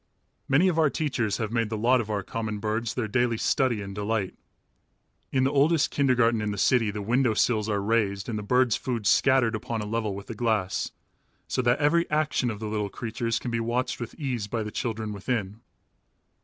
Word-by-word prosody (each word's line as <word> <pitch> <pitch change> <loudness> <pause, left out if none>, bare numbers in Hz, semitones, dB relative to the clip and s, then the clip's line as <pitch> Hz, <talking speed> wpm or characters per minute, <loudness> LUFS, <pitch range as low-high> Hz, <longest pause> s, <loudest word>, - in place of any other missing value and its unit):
Many 150 +8 +4
of 170 -3 +1
our 155 -2 +4
teachers 125 -9 -1
have 110 -2 -3
made 115 -2 0
the 110 - -3
lot 120 +3 +3
of 110 - -7
our 105 -2 -1
common 110 +1 -4
birds 110 +2 -2
their 120 -4 -1
daily 120 +1 +1
study 120 -3 +1
and 100 0 -7
delight. 105 -1 -2 1.0
In 130 -1 +2
the 135 - +2
oldest 145 +2 +3
kindergarten 125 -5 +2
in 105 - -1
the 100 - -3
city 115 +1 +3
the 105 0 -4
window 120 +1 +2
sills 110 -1 +1
are 100 -2 0
raised 100 -3 0
and 110 -3 -2
the - - -4
birds' 125 +2 +2
food 120 -5 -3
scattered 130 0 +4
upon 110 +1 -3
a 105 - -3
level 110 -2 -2
with 100 0 -8
the - - -6
glass, 110 -4 0 0.6
so - - 0
that 120 +1 +3
every 165 +3 +2
action 150 -4 +1
of 110 - -4
the 110 - -5
little 105 -1 -2
creatures 115 +1 -2
can 125 - -4
be 115 - 0
watched 120 +3 -1
with 120 -1 -6
ease 125 -8 -3
by 110 +1 -2
the 105 - -6
children 110 -2 -3
within. 105 0 -3
115 Hz, 210 wpm, -26 LUFS, 105-125 Hz, 1.0 s, Many